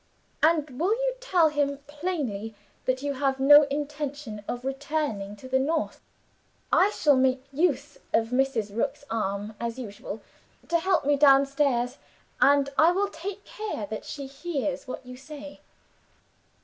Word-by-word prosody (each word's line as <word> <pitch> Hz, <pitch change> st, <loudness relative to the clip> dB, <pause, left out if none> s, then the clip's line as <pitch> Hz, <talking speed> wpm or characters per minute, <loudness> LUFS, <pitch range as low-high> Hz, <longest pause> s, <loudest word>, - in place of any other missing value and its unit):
'And 305 Hz, -5 st, +2 dB
will 380 Hz, +7 st, +3 dB
you -, -, 0 dB
tell 365 Hz, -11 st, +3 dB
him 285 Hz, -1 st, 0 dB
plainly 290 Hz, -, -3 dB, 0.3 s
that 255 Hz, +1 st, 0 dB
you 285 Hz, 0 st, -1 dB
have 270 Hz, 0 st, 0 dB
no 290 Hz, +2 st, +8 dB
intention 285 Hz, -6 st, -4 dB
of 245 Hz, +1 st, -4 dB
returning 270 Hz, -7 st, -2 dB
to 235 Hz, +5 st, -11 dB
the 260 Hz, 0 st, +2 dB
North? 310 Hz, +4 st, -1 dB, 0.7 s
I 385 Hz, -, +6 dB
shall 300 Hz, -8 st, +3 dB
make 260 Hz, 0 st, +2 dB
use 285 Hz, -2 st, 0 dB
of 225 Hz, 0 st, +2 dB
Mrs. 250 Hz, -5 st, 0 dB
Rook's 280 Hz, +5 st, -1 dB
arm, 205 Hz, -1 st, -2 dB
as 235 Hz, 0 st, -3 dB
usual, 205 Hz, -3 st, -7 dB, 0.5 s
to 335 Hz, 0 st, +3 dB
help 360 Hz, -3 st, +1 dB
me 290 Hz, 0 st, +3 dB
downstairs 275 Hz, -2 st, +3 dB, 0.4 s
and 280 Hz, 0 st, +5 dB
I 325 Hz, +2 st, +7 dB
will 395 Hz, +2 st, +1 dB
take 400 Hz, +3 st, -7 dB
care 425 Hz, -, -5 dB
that 215 Hz, -, -4 dB
she 280 Hz, -2 st, -6 dB
hears 280 Hz, 0 st, -3 dB
what 255 Hz, -, -6 dB
you 250 Hz, 0 st, -9 dB
say. 290 Hz, +1 st, -10 dB
280 Hz, 150 wpm, -27 LUFS, 250-305 Hz, 0.7 s, no